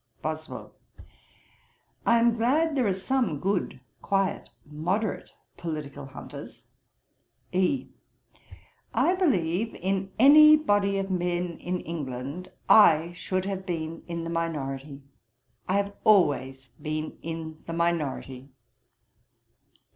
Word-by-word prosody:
BOSWELL. 155 0 -5 1.3
'I 235 0 +5
am 235 0 +3
glad 290 +8 +2
there 260 -5 +1
are - - +2
some 190 - -1
good, 185 -8 -1 0.2
quiet, 195 -1 -1 0.2
moderate 175 +9 -2 0.3
political 145 -4 -6
hunters.' 135 - -10 0.9
E. 185 +9 +1 1.1
'I 355 - +3
believe, 225 - 0
in 190 +1 -2
any 305 +4 +8
body 205 -8 +1
of 195 0 -2
men 175 -1 -1
in 180 0 -3
England, 145 +2 -6 0.2
I 170 -5 +6
should 185 +1 -3
have 190 -1 -4
been 165 -2 -4
in 170 -1 -4
the 165 - -4
Minority; 140 -4 -4 0.7
I - - +2
have 200 0 0
always 140 - +2
been 155 0 -4
in 160 -1 -6
the 165 - -4
Minority.' 150 -6 -2
175 Hz, 110 wpm, -27 LUFS, 155-200 Hz, 1.3 s, any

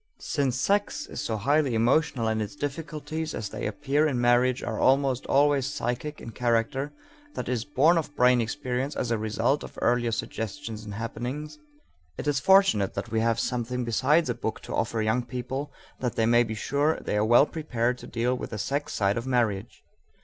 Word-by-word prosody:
Since 135 -4 -1
sex 205 +5 0
is - - -6
so 110 - -2
highly 140 +3 +2
emotional 120 +1 +2
and 110 0 0
its 105 +6 -5
difficulties 155 +1 -4
as 105 -2 -4
they - - -4
appear 145 +7 +1
in 130 -5 -1
marriage 120 +1 +3
are - - -3
almost 135 -1 +2
always 140 -1 +3
psychic 145 +1 -3
in 115 - -8
character 120 +5 0 0.4
that - - -4
is, 120 -3 -1
born 155 +4 +4
of 145 -2 -6
brain 125 -2 +4
experience 125 +3 -2
as 120 - -2
a 115 - +1
result 110 +6 0
of - - -10
earlier 120 -1 +2
suggestions 115 0 -4
and 105 -1 -7
happenings 135 +7 -5 0.6
it - - -5
is 145 -2 +2
fortunate 190 - +4
that - - -4
we 110 - +1
have 115 0 +1
something 125 0 -2
besides 140 +8 +2
a 120 - 0
book 115 -2 -4
to - - -7
offer 115 -1 0
young 110 +3 +1
people 130 +4 -5 0.3
that 125 -2 -2
they 115 - +2
may 120 +1 +5
be 110 -2 -2
sure 145 +8 0
they - - -3
are 105 - +2
well 120 +5 +6
prepared 125 -6 -2
to - - -10
deal 120 +2 0
with 125 - -4
the 110 - -5
sex 140 +7 -2
side 100 +1 +1
of 115 +2 -4
marriage. 115 -6 -1
125 Hz, 195 wpm, -27 LUFS, 115-145 Hz, 0.6 s, well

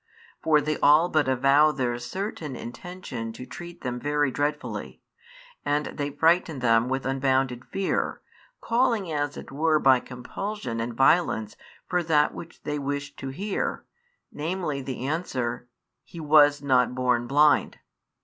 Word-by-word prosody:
For 155 -2 +4
they 155 0 -2
all 155 +4 +5
but 155 -4 +2
avow 135 +4 +4
their 125 -4 -2
certain 165 - -5
intention 120 -4 -7
to 125 - -9
treat 175 +4 -10
them 125 -1 -3
very 145 0 0
dreadfully, 145 +2 -3 0.6
and 145 +1 0
they 145 -1 -2
frighten 160 +1 +2
them 115 -1 +2
with 135 0 -2
unbounded 130 -2 0
fear, 195 0 -2 0.4
calling 230 -6 +1
as 145 -1 -2
it - - -9
were 155 +3 +2
by 135 -3 +5
compulsion 125 - -5
and 115 +1 -3
violence 135 -6 +2 0.3
for 180 -1 +1
that 155 -3 +2
which 170 - -11
they 150 -1 -2
wished 140 0 -4
to 135 - -5
hear, 190 +9 -3 0.5
namely 155 -2 -3
the 130 -1 -5
answer: 130 -6 -3 0.4
"He 170 - -11
was 145 -2 +5
not 125 -2 +2
born 125 -2 +1
blind." 150 +3 +3
145 Hz, 140 wpm, -26 LUFS, 130-160 Hz, 0.6 s, all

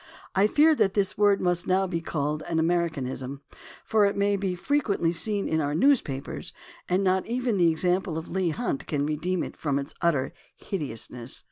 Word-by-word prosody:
I 195 +2 +4
fear 305 +7 +5
that 195 - +2
this 200 -2 +1
word 205 -1 +4
must 175 -1 0
now 190 +1 +3
be 170 -3 -3
called 150 -1 -2
an 165 - 0
Americanism, 145 -6 -1 0.4
for 215 -2 +3
it 200 - -2
may 200 0 +2
be 190 -2 -2
frequently 200 -6 0
seen 200 +4 0
in 160 0 +1
our 145 0 -1
newspapers, 165 - 0 0.4
and 185 +2 +2
not 185 0 +1
even 240 -2 0
the 175 -2 +5
example 175 +1 +1
of 160 - -5
Leigh 185 -1 0
Hunt 245 - -3
can 145 -3 0
redeem 165 +4 -1
it - - -7
from 145 -3 -1
its 140 +1 -5
utter 150 -6 +1 0.2
hideousness. 125 - -3
175 Hz, 180 wpm, -26 LUFS, 155-200 Hz, 0.4 s, fear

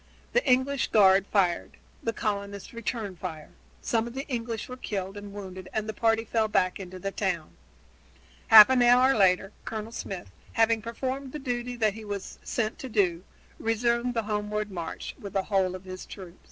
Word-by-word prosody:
The - - +3
English 260 +2 +3
guard 195 -2 +5
fired; 180 -4 +1 0.2
the 230 - -1
colonists 200 -2 -4
returned 220 -4 -4
the - - -29
fire. 160 -4 -6 0.3
Some 230 0 +1
of 240 - -9
the 270 +2 -4
English 230 -3 -3
were 250 - -7
killed 195 -5 -4
and 205 0 -8
wounded 190 -2 -8
and 215 0 -1
the 220 - -3
party 225 +1 +2
fell 220 0 +1
back 185 -3 +1
into 185 -1 -8
the 195 +2 -4
town. 180 -6 -2 1.0
Half 220 +2 +10
an 255 -1 +4
hour 250 +2 +6
later 195 -1 +3
Colonel 220 0 -5
Smith, 190 - -6 0.2
having 225 0 +3
performed 260 +4 -4
the - - -3
duty 245 -3 -3
that 215 -3 +2
he 220 +1 -9
was 205 -2 -6
sent 220 -2 -2
to 260 - -6
do, 185 -6 +1 0.4
resumed 235 +2 +1
the 230 - +1
homeward 210 0 -2
march 170 -3 -5
with 200 - -8
the 195 -1 +1
whole 190 -2 +1
of 185 - -9
his 185 0 -8
troops. 185 -3 -10
215 Hz, 185 wpm, -27 LUFS, 190-235 Hz, 1.0 s, Half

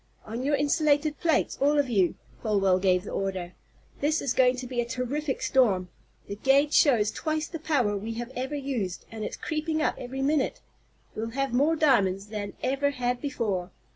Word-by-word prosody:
"On 225 +3 -5
your 285 +3 +2
insulated 295 +1 +2
plates 330 -3 +1
all 290 +2 +4
of 285 -2 +3
you," 195 -7 +2 0.3
Folwell 195 -4 +2
gave 185 -1 +2
the - - -7
order. 185 -2 -3 0.5
"This 305 +2 +1
is 255 - -1
going 255 -1 +4
to 255 0 -6
be 245 -1 -1
a - - 0
terrific 265 +4 -3
storm. 200 -9 +2 0.4
The 200 - -6
gage 280 +5 +3
shows 230 -8 +4
twice 310 0 -2
the 330 - -6
power 270 -10 +1
we 215 +3 -4
have 240 +2 -5
ever 265 +3 -3
used, 260 -10 -3
and 220 -1 -6
it's - - -4
creeping 315 0 -2
up 310 - +1
every 265 +2 -4
minute! 285 -1 +1 0.5
We'll 225 +1 -4
have 275 -2 0
more 290 +6 +3
diamonds 205 -10 +2
than 205 -2 -5
ever 275 +2 +1
had 250 -2 -2
before!" 215 -11 -2
255 Hz, 185 wpm, -27 LUFS, 210-290 Hz, 0.5 s, all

